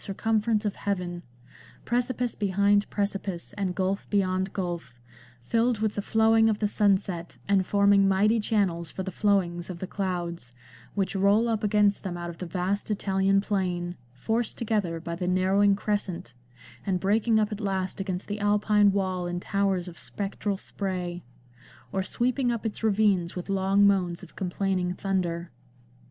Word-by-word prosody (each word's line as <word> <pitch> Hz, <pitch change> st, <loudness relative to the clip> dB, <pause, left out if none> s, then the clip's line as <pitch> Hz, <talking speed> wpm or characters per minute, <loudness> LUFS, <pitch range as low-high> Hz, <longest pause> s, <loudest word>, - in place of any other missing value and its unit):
circumference 220 Hz, +2 st, 0 dB
of 205 Hz, -, -2 dB
heaven; 180 Hz, -3 st, -3 dB, 0.6 s
precipice 245 Hz, 0 st, 0 dB
behind 200 Hz, +1 st, +2 dB
precipice, 195 Hz, -3 st, -3 dB
and 190 Hz, -3 st, -2 dB
gulf 190 Hz, +1 st, -1 dB
beyond 190 Hz, -1 st, +1 dB
gulf, 175 Hz, -, -4 dB, 0.5 s
filled 230 Hz, -, +1 dB
with 215 Hz, 0 st, 0 dB
the 205 Hz, -, -2 dB
flowing 225 Hz, +1 st, +4 dB
of 215 Hz, -, +1 dB
the 210 Hz, -, +1 dB
sunset, 195 Hz, -4 st, 0 dB
and 195 Hz, -2 st, +2 dB
forming 200 Hz, -1 st, +4 dB
mighty 205 Hz, +4 st, +3 dB
channels 195 Hz, -6 st, 0 dB
for 190 Hz, -, -4 dB
the 190 Hz, -, -4 dB
flowings 180 Hz, -3 st, +1 dB
of 180 Hz, -, -5 dB
the 185 Hz, -, -4 dB
clouds, 175 Hz, -9 st, -4 dB, 0.4 s
which 195 Hz, -1 st, -1 dB
roll 200 Hz, +4 st, +3 dB
up 225 Hz, -2 st, -1 dB
against 205 Hz, -1 st, +3 dB
them 180 Hz, -3 st, -4 dB
out 175 Hz, 0 st, -5 dB
of 165 Hz, -, -14 dB
the 180 Hz, -, -5 dB
vast 185 Hz, +5 st, -2 dB
Italian 195 Hz, -1 st, +2 dB
plain, 180 Hz, -4 st, -2 dB, 0.2 s
forced 220 Hz, -, -2 dB
together 205 Hz, -7 st, -1 dB
by 170 Hz, +1 st, -5 dB
the 180 Hz, +1 st, -3 dB
narrowing 190 Hz, +2 st, +3 dB
crescent, 195 Hz, -, -3 dB, 0.5 s
and 185 Hz, -2 st, 0 dB
breaking 220 Hz, +4 st, +2 dB
up 215 Hz, -1 st, +1 dB
at 210 Hz, +1 st, -5 dB
last 190 Hz, -1 st, -2 dB
against 185 Hz, -1 st, -3 dB
the 205 Hz, 0 st, -4 dB
Alpine 205 Hz, 0 st, +3 dB
wall 185 Hz, -2 st, -1 dB
in 175 Hz, 0 st, -3 dB
towers 195 Hz, -1 st, 0 dB
of 170 Hz, -1 st, -10 dB
spectral 200 Hz, 0 st, -3 dB
spray; 180 Hz, -3 st, -4 dB, 0.7 s
or 190 Hz, -, 0 dB
sweeping 245 Hz, +5 st, 0 dB
up 230 Hz, -1 st, -3 dB
its 220 Hz, -, -3 dB
ravines 205 Hz, -5 st, +2 dB
with 180 Hz, +2 st, -6 dB
long 195 Hz, +1 st, +3 dB
moans 180 Hz, -4 st, +2 dB
of -, -, -13 dB
complaining 185 Hz, -1 st, -1 dB
thunder." 175 Hz, -3 st, -2 dB
195 Hz, 160 wpm, -27 LUFS, 180-210 Hz, 0.7 s, flowing